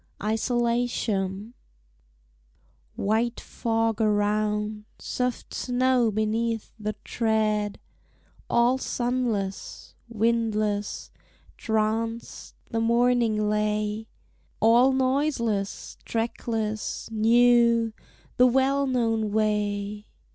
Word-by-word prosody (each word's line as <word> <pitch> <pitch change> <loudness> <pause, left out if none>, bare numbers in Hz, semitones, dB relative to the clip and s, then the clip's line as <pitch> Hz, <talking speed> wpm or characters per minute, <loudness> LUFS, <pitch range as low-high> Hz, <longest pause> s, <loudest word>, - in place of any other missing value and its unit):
_ - - -7
ISOLATION 225 -3 -1 1.4
White 225 +4 0
fog 225 -1 -1
around, 210 0 0
soft 250 -1 -3
snow 250 -1 +2
beneath 220 +1 -1
the 215 0 -3
tread, 215 -2 0 0.7
All 240 +2 +3
sunless, 240 -7 -3 0.2
windless, 215 -2 -1 0.4
tranced, 225 +1 -2 0.2
the 225 - 0
morning 235 -2 +2
lay; 210 +1 -1 0.5
All 240 +4 +5
noiseless, 260 -6 -1
trackless, 225 -2 -3
new, 235 0 +4 0.4
the 250 - +6
well 270 +2 +2
known 225 -4 0
way. 210 -1 -1
225 Hz, 75 wpm, -26 LUFS, 210-240 Hz, 1.4 s, the